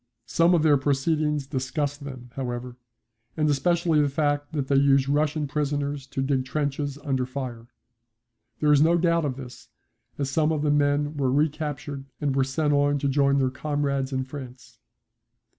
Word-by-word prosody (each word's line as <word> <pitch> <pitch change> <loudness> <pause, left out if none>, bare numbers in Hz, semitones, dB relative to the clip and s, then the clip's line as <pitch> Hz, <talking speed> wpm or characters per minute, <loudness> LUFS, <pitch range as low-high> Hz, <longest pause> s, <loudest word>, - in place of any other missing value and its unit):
Some 170 +6 +3
of 160 - +2
their 150 -2 +5
proceedings 150 +1 0
disgust 140 +2 -3
them 130 -3 -9
however, 125 -1 -5 0.6
and 155 -1 +2
especially 165 +1 +2
the 145 - +2
fact 145 0 -1
that 140 -3 -2
they 140 - +3
use 135 -1 +4
Russian 150 +1 +1
prisoners 145 -1 -2
to 135 - -3
dig 135 -1 +1
trenches 140 +1 -2
under 135 -4 0
fire. 125 -3 -6 0.9
There 150 -1 +4
is 145 -1 +5
no 165 +2 +4
doubt 170 -2 +2
of 135 -3 -2
this, 125 -2 -11 0.5
as 140 - -1
some 155 +1 +2
of 155 -2 -1
the 150 - +2
men 145 +1 +1
were 135 -2 +1
recaptured 145 -1 -2
and 145 -3 -1
were 135 - +3
sent 145 +3 0
on 145 0 +3
to 140 - -1
join 140 0 +3
their 130 -2 +1
comrades 140 -1 -2
in 130 -1 -1
France. 130 -2 -10
145 Hz, 170 wpm, -25 LUFS, 135-150 Hz, 0.9 s, their